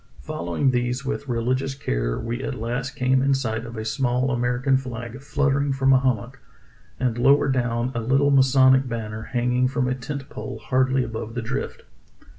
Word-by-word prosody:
Following 85 +11 -1
these 125 +1 -1
with 140 +1 -3
religious 130 +3 -1
care, - - -2
we 120 +3 -4
at 135 - -3
last 125 +4 -3
came 130 +1 +2
in 135 0 +3
sight 115 -3 -2
of 115 0 -8
a 110 - -4
small 125 +1 0
Amer 120 0 0
ican 135 0 +2
flag 125 0 -7
fluttering 140 0 +1
from 135 0 +3
a 130 - +6
hummock, 130 0 -1 0.6
and 120 -2 0
lower 140 +3 +5
down 120 -2 0
a 115 - -2
little 135 +5 +2
masonic 130 -1 +5
banner 110 -2 -4
hanging 125 +2 0
from 130 -1 -1
a 125 - +1
tent 135 +2 -6
pole - - -7
hardly 130 0 +1
above 115 -1 -6
the 120 - -2
drift. 135 +4 -4
130 Hz, 180 wpm, -24 LUFS, 120-135 Hz, 0.6 s, a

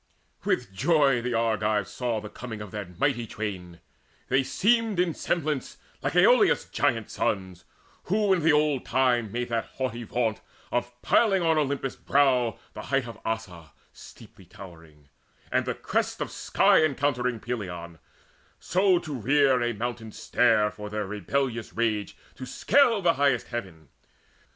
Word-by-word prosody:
With 120 -6 -1
joy 140 - +3
the 120 0 -2
Argives 110 -3 0
saw 120 -3 -2
The 105 - -8
coming 110 0 -8
of 105 -2 -8
that 100 -5 -7
mighty 130 -4 0
twain: 90 -6 -6 0.5
they 135 +1 +3
seemed 205 - +1
In 180 -2 +2
semblance 150 -6 -2 0.2
like - - -2
Aloeus' - - +5
giant - - 0
sons 95 -3 -2 0.4
Who 205 0 +2
in 180 - +1
the 160 +1 +4
old 150 -3 +2
time 120 -5 +1
made 120 +2 -3
that 115 -1 -1
haughty 125 -3 -3
vaunt 115 -2 -2 0.3
Of 120 0 -3
piling 195 -6 +3
on 160 -2 +3
Olympus' 140 -2 -2
brow 130 -5 +2 0.2
the - - -7
height 135 +1 -1
Of 115 -2 -9
Ossa 90 - -5 0.2
steeply - - -15
towering, 80 -6 -14 0.4
and - - +1
the - - -1
crest - - -2
Of - - -4
sky - - +3
encountering 130 -5 0
Pelion, 90 -8 -6 0.6
so 185 0 +2
to 160 -3 -5
rear 135 +1 +3
A 120 0 +1
mountain 115 0 -4
stair 110 -2 +2
for 105 0 -8
their 105 0 -3
rebellious 115 +4 -2
rage 110 -3 -1 0.2
To 130 - -7
scale 230 - +3
the 170 -1 +4
highest 140 -1 +2
heaven. 90 - -7
120 Hz, 150 wpm, -26 LUFS, 105-140 Hz, 0.6 s, Aloeus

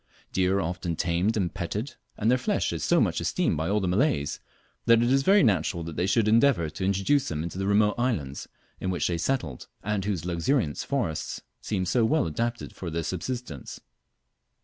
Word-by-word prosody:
Deer 95 +1 +2
are - - +1
often 90 0 -3
tamed 85 +6 +1
and 90 -5 -1
petted, 100 +8 -4 0.2
and 110 +3 +2
their 125 - +4
flesh 125 - 0
is - - -3
so - - +3
much - - +1
esteemed - - +1
by 80 +3 -1
all 105 +1 +2
Malays, 95 - +1 0.5
that 115 0 +6
it 120 - +2
is 135 +1 +4
very 195 +6 +5
natural 85 -6 +1
they 85 +3 -2
should 110 +1 +2
endeavour 110 - +4
to 95 - -5
introduce 100 +9 +2
them 75 -1 -2
into 85 +2 -5
the 95 - -1
remote 105 +1 +4
islands 80 - -1 0.3
in 95 - -2
which 90 -2 0
they 85 - -1
settled, 85 - -2 0.2
and 105 -2 -1
whose 95 -5 -2
luxuriant 85 - 0
forests 120 - -2 0.2
seem 95 -4 -1
so 120 +6 +2
well 150 +6 +2
adapted 115 +8 -3
for 90 - -5
their 85 +1 -2
subsistence. 95 - -5
95 Hz, 190 wpm, -27 LUFS, 85-120 Hz, 0.5 s, that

